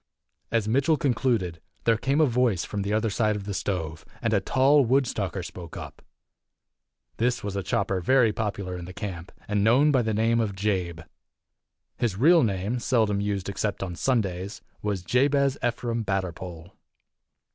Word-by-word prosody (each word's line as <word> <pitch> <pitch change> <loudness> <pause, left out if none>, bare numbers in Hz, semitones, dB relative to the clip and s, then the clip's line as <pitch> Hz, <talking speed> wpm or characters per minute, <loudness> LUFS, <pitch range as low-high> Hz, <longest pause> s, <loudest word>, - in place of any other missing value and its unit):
As 115 -3 0
Mitchell 140 +7 +3
concluded, 115 - 0 0.2
there 115 - +4
came 135 +6 0
a 155 - +6
voice 120 - +1
from 105 - -3
the 100 +1 -2
other 110 0 +1
side 110 0 +1
of 105 - -5
the 100 0 -4
stove, 80 -5 -3 0.2
and 115 -1 0
a 100 - +4
tall 135 +8 +4
Woodstocker 115 -7 0
spoke 85 -2 -9
up. - - -9 1.2
This 120 +1 0
was 100 -1 -4
a 100 - -1
chopper 95 0 -1
very 120 +2 +4
popular 100 -5 -3
in 90 -1 -6
the 90 +1 -10
camp, 95 -5 -6 0.2
and 105 -1 +1
known 130 +7 +5
by 130 -3 +3
the 110 -2 -1
name 115 +2 +2
of 105 -4 -1
Jabe. 95 -4 -1 1.0
His 120 -6 0
real 165 - +6
name, 105 +2 -1
seldom 110 -5 +1
used 100 -2 -2
except 100 0 -2
on 90 -2 -5
Sundays, 100 -4 -1 0.2
was 100 -4 -2
Jabez 140 +5 +2
Ephraim 120 -1 -1
Batterpole. 90 -3 -4
105 Hz, 165 wpm, -26 LUFS, 95-120 Hz, 1.2 s, a